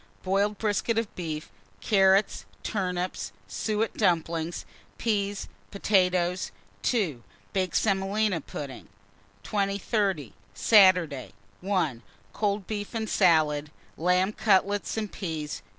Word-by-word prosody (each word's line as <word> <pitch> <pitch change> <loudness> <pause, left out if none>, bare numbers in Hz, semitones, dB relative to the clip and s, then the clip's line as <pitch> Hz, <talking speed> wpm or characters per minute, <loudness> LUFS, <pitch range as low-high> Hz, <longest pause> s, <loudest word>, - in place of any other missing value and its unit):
Boiled 200 +2 +1
brisket 215 +1 0
of 225 -2 -1
beef, 155 -3 -5 0.3
carrots, 195 -1 +3 0.2
turnips, 180 -3 -2 0.2
suet 215 - -1
dumplings, 165 0 0 0.3
peas, 205 -3 -1 0.2
potatoes. 185 -3 +1 0.3
2. 170 - 0 0.3
Baked 185 -3 -1
semolina 195 -2 +1
pudding. 135 -7 -8 0.5
2030. 200 - -1 0.2
Saturday. 180 - +4 0.3
1. 175 - 0 0.3
Cold 205 -2 -1
beef 205 +2 -5
and 220 -1 -1
salad, 155 -5 +3 0.3
lamb 180 +4 +2
cutlets 205 0 +2
and 215 -2 -2
peas. 160 -5 -4
190 Hz, 95 wpm, -27 LUFS, 165-205 Hz, 0.5 s, Saturday